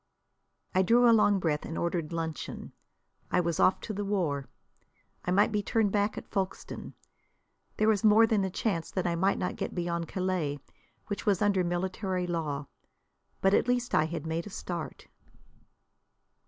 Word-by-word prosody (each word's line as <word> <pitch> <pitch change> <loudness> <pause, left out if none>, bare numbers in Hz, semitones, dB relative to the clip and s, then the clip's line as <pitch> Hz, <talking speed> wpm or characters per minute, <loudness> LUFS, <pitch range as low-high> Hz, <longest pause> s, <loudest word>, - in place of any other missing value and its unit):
I 185 - +4
drew 240 +6 +5
a 230 - +7
long 205 -2 +4
breath, 160 -5 0
and 165 - -5
ordered 170 -2 -1
luncheon. 165 -3 -4 0.6
I - - +2
was 170 -2 0
off 185 - +4
to 215 - -5
the 205 +1 -3
war. 170 -9 -1 0.8
I - - -2
might 200 +5 +4
be 210 -1 +1
turned 210 0 +1
back 205 +1 +1
at - - -8
Folkstone. 190 -2 -4 0.8
There 215 - +2
was 215 -3 +3
more 220 +1 +7
than 215 -3 +1
a 190 - 0
chance 180 -3 -2
that 185 - -2
I 175 - +1
might 190 +4 +2
not 180 - -2
get - - -4
beyond 170 -1 -2
Calais, 180 -6 -1 0.5
which 205 -1 -5
was 200 -3 +3
under 205 -3 +2
military 185 +1 -2
law. 155 -5 -2 0.8
But 195 +1 +4
at 230 - +3
least 245 0 0
I 155 - +4
had 160 -1 -5
made 165 +3 -2
a - - -7
start. 175 -4 -6
185 Hz, 170 wpm, -29 LUFS, 170-205 Hz, 0.8 s, a